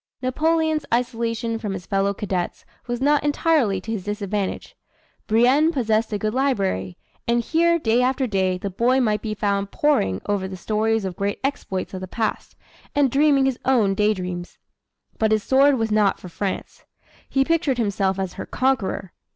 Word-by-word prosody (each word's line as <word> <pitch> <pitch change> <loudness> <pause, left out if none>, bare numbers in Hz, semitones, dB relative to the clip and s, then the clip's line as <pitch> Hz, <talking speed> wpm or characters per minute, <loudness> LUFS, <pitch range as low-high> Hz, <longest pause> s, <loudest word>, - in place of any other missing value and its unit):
Napoleon's 315 +3 +1
isolation 230 -1 -1
from 210 -3 -3
his 180 -2 -6
fellow 195 0 +1
cadets 190 -3 -3 0.2
was 240 -1 -2
not 290 +1 +3
entirely 290 - +2
to 220 - -6
his 205 -4 -4
disadvantage. 205 -1 -3 0.5
Brienne 255 +8 +4
possessed 225 -6 0
a 210 - 0
good 215 +1 -2
library, 195 - 0 0.3
and 235 0 +3
here 335 +5 +3
day 240 -5 +2
after 260 +1 +1
day 190 -5 0
the 195 +2 -5
boy 245 +7 +2
might 215 -4 +1
be 215 -1 -3
found 200 -1 -1
poring 245 - +1
over 200 -2 -1
the 190 0 -7
stories 220 +2 0
of 185 -2 -4
great 200 +2 -2
exploits 230 -10 -3
of 185 - -5
the 185 - -5
past, 220 +3 -3 0.4
and 285 -3 +3
dreaming 280 -1 +4
his 265 -2 0
own 230 -7 +3
day 210 +2 +2
dreams. 180 -1 -6 0.6
But 220 -1 +2
his 215 -1 +2
sword 275 +1 +4
was 225 -1 -1
not 210 -2 +2
for 180 - -10
France. 190 +2 -4 0.5
He 270 0 +2
pictured 320 -5 +1
himself 200 -4 0
as 190 -2 -3
her - - -7
conqueror! 255 -8 -1
220 Hz, 175 wpm, -23 LUFS, 195-265 Hz, 0.6 s, Brienne